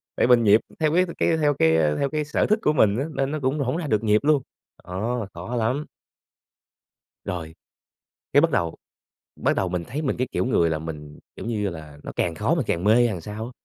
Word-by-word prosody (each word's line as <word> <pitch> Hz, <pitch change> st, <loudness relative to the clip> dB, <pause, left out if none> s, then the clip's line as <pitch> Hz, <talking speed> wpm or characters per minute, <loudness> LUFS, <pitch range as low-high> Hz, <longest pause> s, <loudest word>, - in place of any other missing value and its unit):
tại -, -, +2 dB
mình 120 Hz, -2 st, +5 dB
nhịp 105 Hz, +1 st, +5 dB, 0.2 s
theo 155 Hz, -1 st, +2 dB
cái 180 Hz, +2 st, +4 dB
cái 165 Hz, -, +2 dB
theo 150 Hz, -2 st, +2 dB
cái 80 Hz, -, +3 dB, 0.2 s
theo 140 Hz, -, +1 dB
cái 150 Hz, 0 st, -2 dB
sở 150 Hz, -, 0 dB
thích 215 Hz, +1 st, +2 dB
của 150 Hz, -, +2 dB
mình 110 Hz, -7 st, +3 dB
á 135 Hz, -, -1 dB
nên 135 Hz, -1 st, -1 dB
nó 155 Hz, -, -2 dB
cũng 135 Hz, +3 st, 0 dB
hổng 135 Hz, +2 st, -1 dB
ra 170 Hz, -3 st, -3 dB
được 110 Hz, -4 st, +1 dB
nhịp 105 Hz, -1 st, +4 dB
luôn. 150 Hz, -1 st, +3 dB, 0.4 s
Đó, 110 Hz, +5 st, -3 dB
khó 90 Hz, +9 st, -6 dB
lắm! 125 Hz, +6 st, 0 dB, 1.4 s
Rồi, 80 Hz, -3 st, -5 dB, 0.8 s
cái 145 Hz, -, +6 dB
bắt 165 Hz, +2 st, +3 dB
đầu 85 Hz, -, -1 dB, 0.6 s
bắt -, -, 0 dB
đầu 95 Hz, -, 0 dB
mình 90 Hz, -1 st, -2 dB
thấy 150 Hz, -, -4 dB
mình 145 Hz, -, -1 dB
cái 130 Hz, +1 st, -1 dB
kiểu -, -, 0 dB
người 85 Hz, -10 st, +2 dB
là 80 Hz, -1 st, -1 dB
mình, 75 Hz, -2 st, -8 dB, 0.2 s
kiểu -, -, -8 dB
như 105 Hz, -3 st, -1 dB
là, 75 Hz, -4 st, -10 dB
nó -, -, -6 dB
càng 85 Hz, -2 st, -1 dB
khó 115 Hz, -, +1 dB
mình 155 Hz, -7 st, -1 dB
càng 85 Hz, -, -1 dB
mê 105 Hz, +2 st, +5 dB
hay 120 Hz, +1 st, +5 dB
làm 95 Hz, -7 st, -4 dB
sao 105 Hz, +5 st, -6 dB
á. 120 Hz, -, -8 dB
115 Hz, 235 wpm, -24 LUFS, 90-145 Hz, 1.4 s, cái